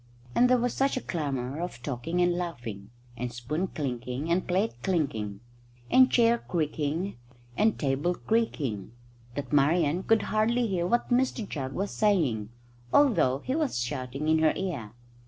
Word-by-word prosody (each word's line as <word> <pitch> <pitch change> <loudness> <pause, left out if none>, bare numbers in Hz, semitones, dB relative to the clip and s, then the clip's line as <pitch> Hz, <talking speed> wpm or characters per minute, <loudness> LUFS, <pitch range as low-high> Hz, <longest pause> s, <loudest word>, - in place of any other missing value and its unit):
And 250 +1 +4
there 255 - +5
was 245 0 0
such 275 0 +1
a - - -2
clamour 140 -3 -3
of 155 -9 -6
talking 145 +6 -2
and 175 0 +3
laughing, 120 - -5 0.3
and 120 0 -4
spoon 130 +10 -2
clinking 130 0 -3
and 180 +2 +1
plate 190 +5 +1
clinking, 110 - -1 0.5
and 255 0 +7
chair 235 -1 +4
creaking 160 - -2 0.4
and 220 - +2
table 145 +5 0
creaking, 140 - -1 0.4
that 140 -3 -5
Marian 150 +3 +3
could 225 +1 +3
hardly 230 +3 +1
hear 180 -5 0
what 240 +5 0
Mr 245 -3 +1
Jugg 135 -3 -4
was 195 +2 -2
saying, 150 - +1 0.4
although 175 - +4
he 260 - 0
was 305 - 0
shouting 130 +4 -3
in 160 0 +4
her 160 0 +4
ear. 145 - -4
160 Hz, 155 wpm, -28 LUFS, 130-210 Hz, 0.5 s, and